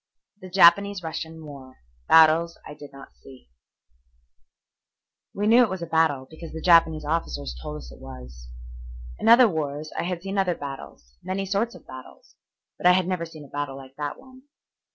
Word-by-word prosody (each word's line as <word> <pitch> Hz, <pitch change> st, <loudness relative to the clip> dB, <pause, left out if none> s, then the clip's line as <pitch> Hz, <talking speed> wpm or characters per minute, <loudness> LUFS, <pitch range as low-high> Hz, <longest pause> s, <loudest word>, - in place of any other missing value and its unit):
THE 185 Hz, -, -10 dB
JAPANESE 190 Hz, +1 st, +4 dB
RUSSIAN 160 Hz, 0 st, -6 dB
WAR: 135 Hz, -3 st, -12 dB, 0.3 s
BATTLES 160 Hz, +1 st, +5 dB
I -, -, -9 dB
DID 145 Hz, -1 st, -13 dB
NOT 135 Hz, 0 st, -14 dB
SEE 130 Hz, -, -16 dB, 1.8 s
We 205 Hz, -, -2 dB
knew 230 Hz, +3 st, +6 dB
it 240 Hz, -, +3 dB
was 185 Hz, -2 st, -5 dB
a -, -, -3 dB
battle 160 Hz, -5 st, +1 dB
because 160 Hz, +2 st, -11 dB
the 160 Hz, -, -6 dB
Japanese 160 Hz, -2 st, +4 dB
officers 145 Hz, -, -3 dB
told 75 Hz, +4 st, -6 dB
us 60 Hz, -5 st, -11 dB
it -, -, -14 dB
was. 60 Hz, -1 st, -12 dB, 0.7 s
In -, -, +1 dB
other 240 Hz, +1 st, +8 dB
wars 155 Hz, -4 st, -4 dB
I -, -, -2 dB
had 175 Hz, 0 st, -4 dB
seen 195 Hz, 0 st, -3 dB
other 180 Hz, -3 st, +1 dB
battles, 135 Hz, -, -10 dB
many 190 Hz, +2 st, -3 dB
sorts 205 Hz, +5 st, -1 dB
of -, -, -15 dB
battles, 130 Hz, 0 st, -13 dB, 0.4 s
but -, -, +2 dB
I 180 Hz, -, +7 dB
had 185 Hz, -1 st, +1 dB
never 180 Hz, -3 st, -2 dB
seen 155 Hz, -2 st, -12 dB
a -, -, -17 dB
battle 145 Hz, -1 st, -5 dB
like 135 Hz, 0 st, -13 dB
that 145 Hz, -1 st, -5 dB
one. 260 Hz, 0 st, -17 dB
160 Hz, 180 wpm, -24 LUFS, 140-185 Hz, 1.8 s, other